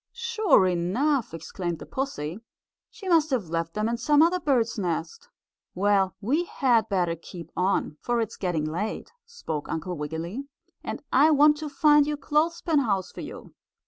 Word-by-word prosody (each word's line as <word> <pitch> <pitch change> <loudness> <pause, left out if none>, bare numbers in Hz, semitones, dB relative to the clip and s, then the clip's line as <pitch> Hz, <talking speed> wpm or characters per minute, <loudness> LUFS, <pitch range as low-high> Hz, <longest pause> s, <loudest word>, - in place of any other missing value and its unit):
"Sure 450 - +3
enough!" 225 - 0
exclaimed 170 +1 -5
the - - -10
pussy. 205 - -4 0.5
"She 415 -4 -11
must 325 -3 +4
have 235 - -1
left 165 0 -3
them 215 +1 0
in 235 +1 -1
some 295 +5 +4
other 355 +2 +2
bird's 240 -8 +1
nest." 455 - -3 0.5
"Well, 195 0 +2
we 285 - 0
had 245 -8 +1
better 175 -4 +1
keep 170 +1 -11
on, 180 -4 0
for 240 -1 0
it 225 -2 -1
is - - -11
getting 175 -5 -1
late," 180 +8 -4 0.2
spoke 160 - -5
Uncle 170 +3 -3
Wiggily, 165 - -5 0.4
"and - - -5
I 290 +4 +6
want 300 0 +5
to 305 0 -5
find 295 0 +4
your 300 0 -1
clothespin 315 +2 +1
house 195 -8 -1
for - - -8
you." - - -9
230 Hz, 170 wpm, -26 LUFS, 180-300 Hz, 0.5 s, I